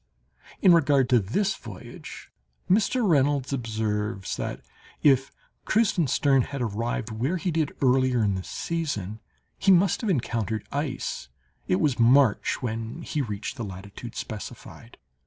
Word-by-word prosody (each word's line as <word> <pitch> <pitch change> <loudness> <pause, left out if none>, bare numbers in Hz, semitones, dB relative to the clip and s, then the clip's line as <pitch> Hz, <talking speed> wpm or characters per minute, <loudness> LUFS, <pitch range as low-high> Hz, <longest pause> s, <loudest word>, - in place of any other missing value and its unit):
In 185 - +8
regard 145 -5 +4
to 125 - +5
this 195 - 0
voyage, 105 -6 -10 0.4
Mr. 215 +4 +2
Reynolds 140 -4 +2
observes 110 -4 -2
that, - - -4 0.4
if 135 -2 +4 0.3
Kreutzenstern 150 - +3
had 140 - -6
arrived 115 0 -2
where 130 +12 -1
he 180 +1 -2
did 155 -2 0
earlier 130 -2 +3
in 100 -2 +2
the 95 -1 -3
season, 110 - -3 0.4
he 195 - +4
must 185 +1 +4
have 225 - -1
encountered 115 - -1
ice—it 70 - -4
was 135 -1 +1
March 125 0 +4
when 115 +6 -4
he 150 - -2
reached 110 +1 -4
the 120 - -4
latitude 100 +4 -8
specified. 110 -2 -8
125 Hz, 130 wpm, -26 LUFS, 110-150 Hz, 0.4 s, In